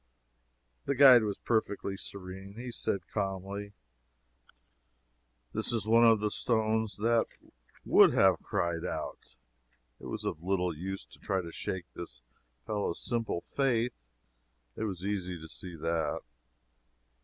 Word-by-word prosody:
The 140 - 0
guide 130 -3 +9
was 105 -2 -2
perfectly 105 -3 -1
serene. 95 0 -8
He 125 +1 -5
said, 100 -5 -2
calmly, 100 0 -3 1.8
"This - - -1
is 115 -4 0
one 115 +2 +5
of 115 -2 +6
the 105 0 0
stones 110 -2 +1
that 115 +2 +2 0.6
would - - +7
have - - +5
cried 85 -1 -1
out." - - -5 0.6
It - - -9
was - - -5
of 75 - -3
little 90 -2 0
use 95 +4 -5
to - - -17
try 95 -2 0
to 85 - -7
shake 90 +1 -4
this 60 -8 -8 0.4
fellow's 105 -5 -1
simple 115 -7 -1
faith 125 -3 0 0.8
it 110 - -2
was 95 -3 -4
easy 90 -4 -2
to 80 - -9
see 90 +2 -8
that. 80 +1 -1
100 Hz, 130 wpm, -31 LUFS, 90-110 Hz, 1.8 s, guide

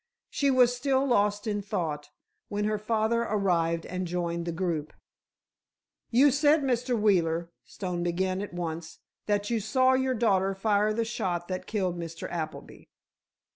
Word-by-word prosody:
She 280 - +1
was 250 -2 +4
still 265 +1 +1
lost 205 -4 +2
in 205 -2 -1
thought, 155 -7 -3 0.4
when 205 0 -1
her 215 0 0
father 220 +2 +1
arrived 175 -7 0
and 185 0 -4
joined 170 -1 -2
the - - 0
group. 165 -3 -2 1.2
"You 270 +4 +5
said, 290 +2 +3
Mr. 250 -2 0
Wheeler," 170 -5 +2
Stone 180 -3 -4
began 185 +2 -1
at 205 - -6
once, 165 -2 -5 0.3
"that 205 +1 0
you 230 - +1
saw 255 +5 +3
your 260 0 +1
daughter 195 -4 +2
fire 210 +1 +2
the 230 +1 0
shot 175 -6 -2
that 185 0 -4
killed 185 -5 -1
Mr. 165 -1 -6
Appleby?" 160 -2 -6
200 Hz, 150 wpm, -28 LUFS, 175-230 Hz, 1.2 s, You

